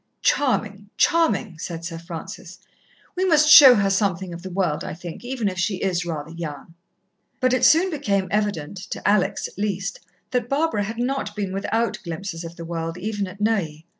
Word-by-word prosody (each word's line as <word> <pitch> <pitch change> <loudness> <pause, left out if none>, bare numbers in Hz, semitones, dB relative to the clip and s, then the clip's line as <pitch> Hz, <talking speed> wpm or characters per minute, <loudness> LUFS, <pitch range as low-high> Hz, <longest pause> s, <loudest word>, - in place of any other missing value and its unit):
"Charming, 210 -7 0
charming!" 315 - +2
said 170 -1 -6
Sir 165 -1 -5
Francis. 175 +1 -8 0.6
"We 370 - 0
must 310 -5 +4
show 275 -4 +11
her 200 -2 +2
something 190 -2 0
of 170 - -8
the 190 - -7
world, 180 -5 -1
I - - -5
think, 175 +3 -9
even 245 -3 -2
if 185 -2 -3
she 190 +3 0
is 180 -2 -1
rather 155 -1 -5
young." 165 -1 -7 0.7
But 255 -1 +2
it 255 - +1
soon 360 +4 +5
became 200 - 0
evident, 200 -5 -1
to - - -4
Alex, 205 -2 +1
at - - -14
least, 200 0 -2 0.3
that 245 -2 -1
Barbara 275 -8 0
had 220 +2 -6
not 245 -4 -2
been 200 -3 -3
without 225 +4 -1
glimpses 170 0 -5
of 165 0 -8
the 170 - -8
world, 165 0 -4
even 205 +1 -3
at 185 +2 -11
Neuilly. 180 -8 -1
195 Hz, 185 wpm, -23 LUFS, 170-225 Hz, 0.7 s, show